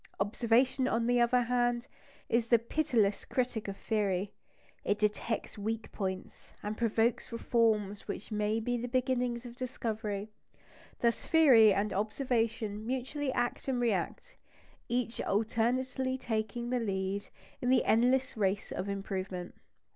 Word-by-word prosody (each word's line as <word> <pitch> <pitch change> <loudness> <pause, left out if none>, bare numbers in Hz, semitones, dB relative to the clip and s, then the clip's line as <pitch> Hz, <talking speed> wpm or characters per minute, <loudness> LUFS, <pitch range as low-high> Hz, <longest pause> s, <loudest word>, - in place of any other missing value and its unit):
Observation, 235 +5 +2
on 230 -1 +1
the 245 +1 +3
other 245 +1 +4
hand, 240 0 +1 0.4
is 235 0 +1
the 235 - +6
pitiless 230 -4 +1
critic 245 -4 -2
of 195 0 -5
theory; 200 -3 -1 0.5
it 205 - +1
detects 210 +1 -1
weak 220 +2 -3
points, 190 -2 -5
and 210 +1 -3
provokes 230 +1 +1
reforms 220 -4 +1
which 215 - -6
may 210 +1 0
be 245 +2 -1
the 240 +1 -3
beginnings 250 -1 0
of 240 -1 -8
discovery. 220 -4 -3 0.7
Thus, 235 -1 +2
theory 260 -10 +7
and 200 +2 0
observation 220 -1 -1
mutually 265 +4 -2
act 245 0 -1
and 260 -2 0
react, 235 - -1 0.5
each 240 -1 -1
alternately 250 +5 0
taking 235 0 -2
the 250 - +2
lead 195 -2 -2 0.3
in 245 - 0
the 255 -1 +4
endless 250 +4 +3
race 200 -2 0
of 195 - -3
improvement. 190 -2 -4
230 Hz, 130 wpm, -31 LUFS, 210-245 Hz, 0.7 s, theory